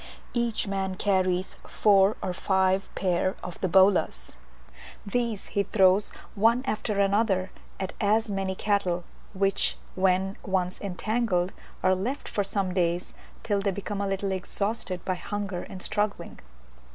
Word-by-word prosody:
Each 235 -2 0
man 195 -1 -2
carries 185 -2 +1
four 200 0 +4
or 185 - -1
five 190 +1 +1
pair 185 0 +1
of 180 -2 -7
the 190 - +2
bolas; 185 - +3 0.7
these 230 0 -1
he 200 - +3
throws 195 0 +4 0.2
one 230 +4 +3
after 215 -3 -1
the 200 0 +3
other 195 -4 +1 0.3
at 190 -1 -3
as 220 +2 +3
many 195 -1 -1
cattle, 185 -4 0 0.3
which, 195 0 +1 0.2
when 190 +1 +1
once 185 -2 -1
entangled, 200 -1 0 0.3
are 185 0 +5
left 230 +10 -3
for 205 - 0
some 195 -2 -1
days 175 -1 0 0.3
till 205 -2 +1
they 200 - +1
become 200 +1 -3
a 200 - 0
little 195 0 -1
exhausted 190 0 -3
by 185 - +1
hunger 200 0 -4
and 185 - -8
struggling. 210 -1 -2
195 Hz, 140 wpm, -27 LUFS, 185-205 Hz, 0.7 s, are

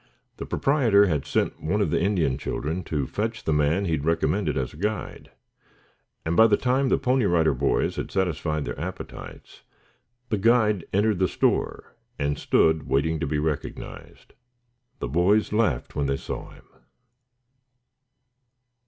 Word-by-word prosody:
The - - -6
proprietor 120 -8 +3
had 75 -6 -1
sent - - -1
one 90 +7 0
of 100 -7 +1
the - - +1
Indian 90 -8 +1
children 80 +5 -3
to 75 -4 -1
fetch 110 - -3
the 80 - 0
man 75 +6 +2
he 85 - -1
had 75 -3 -1
recommended 80 +1 0
as 65 -2 -2
a - - -13
guide, 105 +4 -4 1.0
and 80 +1 0
by 110 +4 +7
the 105 -2 +3
time 130 +1 +1
the - - +3
Pony 130 -3 +1
Rider 80 -4 +3
Boys 70 +2 0
had - - -3
satisfied 80 -5 -1
their - - -5
appetites, 90 +4 -8 0.7
the 105 - 0
guide 110 -3 +3
entered 105 -1 +2
the 95 - +3
store - - -1 0.2
and 70 0 -1
stood 80 -2 +2
waiting 80 +4 +1
to - - -2
be 75 +1 -1
recognized. 75 -1 -5 0.6
The - - -4
boys 90 - +2
laughed 105 - 0
when 70 -1 0
they 70 0 0
saw - - -6
him. - - -17
85 Hz, 155 wpm, -25 LUFS, 75-105 Hz, 1.0 s, by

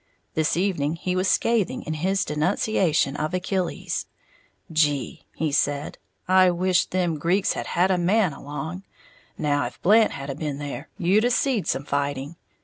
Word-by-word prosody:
This 160 +1 +1
evening 170 -5 0
he 180 +2 -2
was 185 +1 +1
scathing 230 -3 +1
in 155 - -3
his 190 +5 0
denunciation 155 -1 +1
of 155 +4 -2
Achilles. 185 0 -2 0.6
"Gee," 150 -3 0
he 160 -2 -1
said, 145 0 0 0.3
"I 185 0 +6
wisht 180 +1 +1
them 175 -4 0
Greeks 180 +5 +1
had - - -5
a - - -7
had 185 +2 +2
a 185 - +2
man 185 -1 +2
along. 155 +6 -6 0.6
Now 145 -1 +1
if - - -12
Blant 215 +3 +5
had 140 0 -5
a - - -3
been 145 0 -4
there, 145 +1 -6
you'd 200 +4 +3
a - - +3
seed 245 -4 +1
some 135 +2 -1
fighting! 140 +2 -2
170 Hz, 165 wpm, -24 LUFS, 145-185 Hz, 0.6 s, I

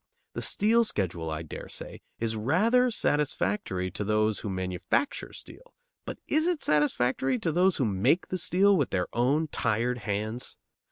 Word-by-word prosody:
The - - -4
Steel 225 +3 +3
schedule, 90 - -2
I 80 +1 -4
dare 80 - -8
say, - - -8 0.2
is 110 -1 -2
rather 215 - +3
satisfactory 100 - -1
to 105 +2 -4
those 110 0 +1
who 105 - -5
manufacture 95 - -2
steel, - - -12 0.3
but - - -6
is 310 +2 +2
it 355 -4 -1
satisfactory 135 -3 +1
to 160 - -1
those 180 +3 +3
who 130 - +1
make 105 - +1
the 185 - -2
steel 195 +4 +3
with 145 -7 +1
their 90 -2 0
own 140 +7 +2
tired 120 +1 0
hands? 110 +3 -3
125 Hz, 160 wpm, -28 LUFS, -, 0.3 s, Steel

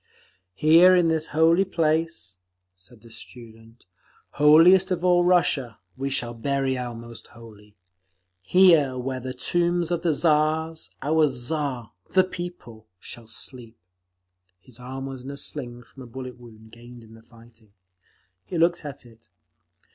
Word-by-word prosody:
"Here 165 - +6
in 175 -2 +3
this 160 -1 0
holy 165 +4 +3
place," 160 - -2 0.4
said 105 +5 -19
the 115 - -17
student, 115 0 -15 0.5
"holiest 165 +6 +5
of 180 -1 -2
all 175 -1 +4
Russia, 155 - +1 0.2
we 135 +1 -4
shall 125 -3 -3
bury 135 +3 -2
our 125 -2 -5
most 115 0 -12
holy. 105 -3 -16 0.6
Here 155 - +4
where 130 +1 -4
are - - -6
the 130 +1 -7
tombs 175 +5 0
of 170 -1 -1
the 170 - +1
Tsars, 155 +1 0
our 155 +2 +2
Tsar—the 130 - -2
People—shall 120 - -10
sleep…." 115 0 -9 0.8
His 125 +4 -13
arm 130 +2 -7
was 135 -2 -8
in 135 - -8
a 140 - -7
sling, 120 -5 -4
from 130 +3 -16
a 125 - -10
bullet 125 +1 -9
wound 110 -2 -16
gained 120 0 -14
in 110 0 -17
the 115 - -16
fighting. 115 -2 -21 0.7
He 175 - -6
looked 170 +1 +1
at 140 -3 -9
it. 115 -3 -20
130 Hz, 145 wpm, -24 LUFS, 115-160 Hz, 0.8 s, Here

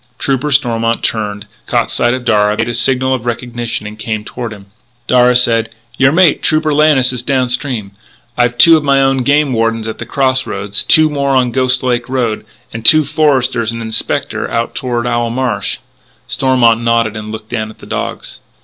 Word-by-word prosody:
Trooper 140 +3 -1
Stormont 115 -4 0
turned, 105 -2 -2 0.2
caught - - 0
sight 120 +1 +1
of 125 -1 -7
Darragh, 105 -2 +2
made 115 - -1
a 120 - -3
signal 130 +3 +1
of 130 -3 -3
recognition, 120 -2 -4
and 105 +1 -9
came 110 0 -4
toward 120 -1 -6
him. 100 -2 -11 0.4
Darragh 125 0 +4
said: 115 -2 +1 0.2
"Your 135 +1 +3
mate, 170 -1 +3
Trooper 155 -1 +1
Lannis, 145 -4 +3
is 125 - -2
down 130 -1 0
stream. 125 -6 -2 0.4
I've 120 0 0
two 165 +6 +7
of 155 - 0
my 140 -1 +2
own 135 0 +2
game 140 +1 +1
wardens 115 -1 -1
at 110 - -6
the 120 - -7
cross 130 0 0
roads, 100 0 -1
two 155 0 +5
more 140 -2 -1
on 130 -1 +2
the - - -13
Ghost 130 -1 +1
Lake 125 -1 -1
Road, 120 -5 -2 0.3
and 115 0 -6
two 155 +5 +5
foresters 130 -6 +1
and 115 - -6
an 115 -1 -5
inspector 110 - -2
out 115 0 -2
toward 120 -2 -3
Owl 120 -1 -1
Marsh." 120 -5 -2 0.5
Stormont 120 -4 +2
nodded, 115 -2 0
looked 110 0 -8
down 110 -3 -3
at 110 - -14
the - - -14
dogs. - - -5
120 Hz, 195 wpm, -14 LUFS, 115-130 Hz, 0.5 s, two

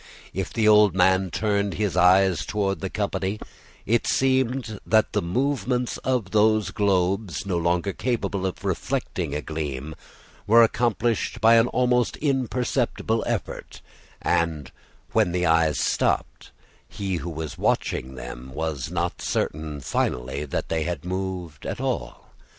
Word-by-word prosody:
If 95 0 -3
the 110 -2 +1
old 105 -2 +6
man 95 0 +3
turned 100 +2 0
his 105 -3 -1
eyes 95 0 +4
toward 100 -2 -1
the 95 - -3
company, 100 0 -2 0.5
it 115 +2 +1
seemed 130 -4 +1
that 110 -1 +2
the 105 - +1
movements 125 +5 -1
of 125 -7 -1
those 110 0 +3
globes, 95 -3 0
no 95 -3 -1
longer 85 +3 0
capable 105 -6 -1
of 95 - -7
reflecting 70 - -2
a 75 - -3
gleam, 75 -2 -4 0.5
were 115 +2 +7
accomplished 115 0 0
by 115 +1 +6
an 115 +1 +5
almost 125 -1 +1
imperceptible 125 -4 0
effort; - - -4 0.4
and, 80 -6 0 0.4
when 105 -6 +2
the 90 0 +1
eyes 80 -4 +3
stopped, - - 0 0.4
he 95 -3 -3
who 85 +1 -5
was 80 -2 -6
watching 65 +1 -1
them - - -8
was 80 -3 -3
not 85 0 -2
certain 75 -1 -2
finally 65 +3 -2
that 70 - -3
they 80 -1 0
had 85 -1 -3
moved 90 -4 -4
at - - -4
all. - - -4
95 Hz, 140 wpm, -24 LUFS, 80-110 Hz, 0.5 s, were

